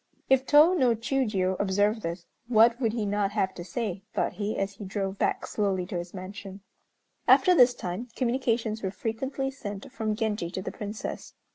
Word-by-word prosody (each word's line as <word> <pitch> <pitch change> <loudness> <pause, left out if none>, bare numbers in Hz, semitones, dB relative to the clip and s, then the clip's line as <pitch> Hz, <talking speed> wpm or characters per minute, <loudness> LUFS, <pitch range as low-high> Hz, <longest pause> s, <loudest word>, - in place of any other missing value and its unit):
"If 265 0 +4
Tô 305 +5 +7
no 250 -7 +3
Chiûjiô 215 -6 0
observed 205 +3 +1
this, 170 0 -5 0.2
what 235 +1 +5
would 225 -3 +2
he 225 -3 -1
not 205 0 0
have 190 -3 0
to 175 - -7
say?" 195 +1 -3
thought - - 0
he, 210 +1 -3
as 195 0 -1
he 200 - -10
drove 195 0 -3
back - - 0
slowly 195 -4 -1
to 180 - -4
his 175 0 -7
mansion. 195 +1 -8 0.7
After 365 - +6
this 250 -6 +6
time 180 +7 -5
communications 235 -3 0
were 190 - -1
frequently 265 +7 -3
sent 205 -7 -7
from 220 -4 -2
Genji 210 -6 -1
to 185 - -4
the 190 - -4
Princess. 210 +1 -6
210 Hz, 180 wpm, -27 LUFS, 195-235 Hz, 0.7 s, Tô